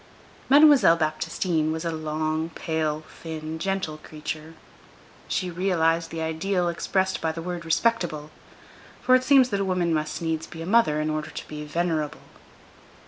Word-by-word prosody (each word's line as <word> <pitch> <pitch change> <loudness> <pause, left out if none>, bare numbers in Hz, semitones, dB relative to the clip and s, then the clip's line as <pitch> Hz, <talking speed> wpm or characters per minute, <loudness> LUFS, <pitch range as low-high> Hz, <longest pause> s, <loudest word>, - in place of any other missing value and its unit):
Mademoiselle 285 - +7
Baptistine 160 0 -1
was 160 +1 -4
a 165 - 0
long, 155 0 -2
pale, 155 -1 -2 0.2
thin, 160 -1 -5
gentle 190 -5 -2
creature; 155 +1 -7 0.7
she 185 -2 -1
realized 165 -2 +1
the 165 -1 -4
ideal 175 +3 0
expressed 190 +2 -1
by 160 - 0
the 160 - -7
word 175 0 -5
"respectable"; 165 -5 0 0.7
for 255 - +4
it 255 0 +5
seems 260 -1 +5
that 200 - -1
a - - 0
woman 180 -3 +1
must 155 -1 -2
needs 160 -1 -2
be 165 -1 -8
a - - -6
mother 190 -7 +3
in 155 0 -1
order 155 0 -3
to - - -8
be 150 0 -6
venerable. 155 -1 -2
165 Hz, 155 wpm, -25 LUFS, 155-185 Hz, 0.7 s, Mademoiselle